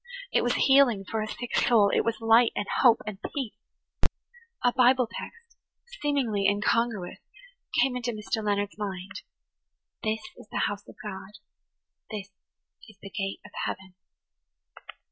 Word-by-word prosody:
It - - +4
was - - +1
healing 265 -8 +5
for 220 +3 -2
a 215 - -2
sick 245 +2 -5
soul; 210 -4 +5
it - - +3
was 230 -1 -1
light 225 +1 +5
and 205 - -1 0.2
hope 240 -3 +6
and 210 -3 -6 0.2
peace. 265 -7 -2 1.1
A 245 -1 +4
Bible 255 0 +5
text, 465 - -10 0.4
seemingly 250 -9 +1
incongruous, 210 -1 +1 0.6
came 265 -2 +3
into 245 -1 -1
Mr. 215 0 -3
Leonard's 205 0 -1
mind–"This 205 +2 -7 0.2
is - - -13
the - - 0
house 205 0 -5
of - - -13
God; 200 -1 -7 0.8
this 205 -2 -6 0.6
is 215 - -17
the 195 - -8
gate 195 -4 -3
of 210 - -12
heaven." 190 -1 -5
215 Hz, 140 wpm, -28 LUFS, 205-245 Hz, 1.1 s, hope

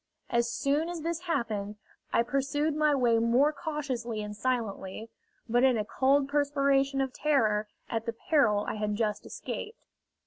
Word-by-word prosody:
As 235 -1 +2
soon 290 +7 0
as 345 -2 -5
this 335 +1 -2
happened, 210 -9 -2 0.4
I 230 - +3
pursued 285 +4 0
my 300 -1 +3
way 240 -4 +3
more 245 +6 +3
cautiously 265 -7 -3
and 210 0 -6
silently, 220 -3 -3 0.4
but 240 +2 +2
in 260 -3 +4
a 210 - -1
cold 270 +4 +2
perspiration 280 -1 +2
of 265 -1 -2
terror 215 -8 +1 0.2
at 225 0 -3
the 230 - -1
peril 235 - +3
I - - -3
had 210 0 -1
just 210 -1 -2
escaped. 440 +2 -7
255 Hz, 160 wpm, -29 LUFS, 225-285 Hz, 0.4 s, in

